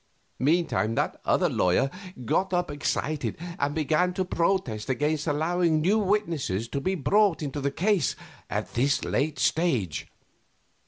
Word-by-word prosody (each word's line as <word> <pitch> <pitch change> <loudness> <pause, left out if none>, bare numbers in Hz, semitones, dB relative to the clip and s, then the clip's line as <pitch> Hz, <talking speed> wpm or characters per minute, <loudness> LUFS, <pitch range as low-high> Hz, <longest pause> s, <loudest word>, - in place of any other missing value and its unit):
Meantime 145 -7 +1
that - - -1
other - - +3
lawyer 110 +10 +2 0.3
got 190 - +1
up 175 -3 0
excited 145 +1 -2 0.2
and 145 +1 0
began 160 +4 +1
to 185 - 0
protest 170 - -1
against 150 +4 0
allowing 160 +2 +1
new 195 +8 +3
witnesses 170 - 0
to 140 +4 -3
be 190 +6 0
brought 190 +2 +2
into 145 0 -4
the 140 - +1
case 185 +1 +1 0.3
at - - -3
this 135 +4 +1
late 150 +1 0
stage. 125 - 0
155 Hz, 140 wpm, -26 LUFS, 135-180 Hz, 0.3 s, other